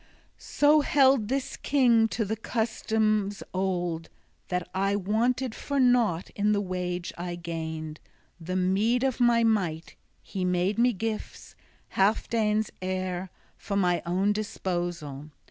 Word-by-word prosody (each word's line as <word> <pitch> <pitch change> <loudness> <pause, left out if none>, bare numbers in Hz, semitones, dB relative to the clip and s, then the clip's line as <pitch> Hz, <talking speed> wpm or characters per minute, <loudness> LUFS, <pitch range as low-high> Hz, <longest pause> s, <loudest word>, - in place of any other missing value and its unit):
XXIX - - -31
"So 295 +1 +4
held 270 -6 +4
this 270 +2 -2
king 240 -5 +3
to 220 0 -2
the 215 +3 -2
customs 220 -2 -1
old, 175 -3 -2 0.4
that 180 -1 -2
I 195 +1 +1
wanted 225 +5 0
for 280 +3 -3
nought 240 -9 +2
in 210 +1 +1
the 205 - +1
wage 180 -2 -3
I 175 0 -4
gained, 160 -2 -5 0.4
the 180 +2 -4
meed 200 +7 +2
of 265 -2 0
my 240 -1 +4
might; 180 -8 0 0.3
he 190 - -4
made 180 +4 +1
me 245 +1 +5
gifts, 220 +1 -5 0.4
Healfdene's 215 +1 +1
heir, 185 0 -3 0.3
for 200 - -4
my 180 -3 +2
own 190 +4 +1
disposal. 175 -8 -4
200 Hz, 130 wpm, -27 LUFS, 180-225 Hz, 0.4 s, me